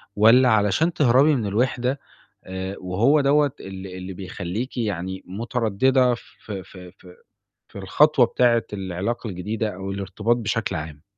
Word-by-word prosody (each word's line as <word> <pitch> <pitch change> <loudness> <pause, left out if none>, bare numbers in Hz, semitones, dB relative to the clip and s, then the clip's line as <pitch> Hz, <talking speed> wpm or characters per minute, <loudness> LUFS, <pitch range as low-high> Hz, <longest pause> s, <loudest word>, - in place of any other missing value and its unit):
والّا 115 +5 +6
علشان 110 - +2
تهربي 140 +2 +4
من 115 - -2
الوِحدة 125 +5 0 0.5
آآ، 95 +1 -5
وهو 110 +12 +2
دوّة 145 0 +3
اللي 95 -1 -8
اللي 95 +1 -7
بيخلّيكِ 95 +5 -5
يعني 95 -4 -3
متردِّدة 120 +4 +1
في 105 -4 -9
في 90 -1 -12
في 90 -1 -16 0.5
في - - -25
الخطوة 135 +8 +4
بتاعة 120 -1 +2
العلاقة 95 +4 -3
الجديدة 105 +3 -3
أو 95 +1 -5
الارتباط 100 +4 -1
بشكل 110 -3 -2
عام؟ 75 -1 -7
105 Hz, 135 wpm, -23 LUFS, 95-125 Hz, 0.5 s, والّا